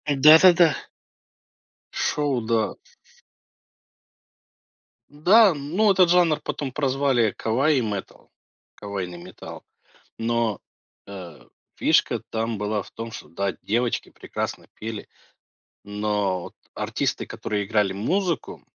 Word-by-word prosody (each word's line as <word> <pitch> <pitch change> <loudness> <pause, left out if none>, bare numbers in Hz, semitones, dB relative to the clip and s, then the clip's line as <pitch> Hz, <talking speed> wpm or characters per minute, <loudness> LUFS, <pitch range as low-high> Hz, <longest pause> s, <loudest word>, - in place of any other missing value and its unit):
Да-да-да. 160 +3 +7 1.2
Шоу, 145 -4 0
да. 110 -2 0 2.4
Да, 185 +7 +5
ну, 170 +9 +1
этот 185 -2 +4
жанр 170 -3 +3
потом 135 -3 -4
прозвали 135 -5 +1
кавай-метал, 115 -4 -1 0.5
кавайный 95 -4 -5
металл, 90 +2 -11 0.5
но, 115 -2 0 0.5
э, 90 -6 -10 0.3
фишка - - +2
там 115 0 -2
была 105 0 -2
в - - -16
том, 115 0 -7
что - - -10
да, 100 +3 -2
девочки 120 +3 -1
прекрасно - - -6
пели, 110 -1 -7 0.8
но 105 -3 -1
вот - - -10 0.2
артисты, - - -2
которые 105 -2 -3
играли 105 -3 +1
музыку 170 - -2
115 Hz, 95 wpm, -24 LUFS, 105-150 Hz, 2.4 s, Да-да-да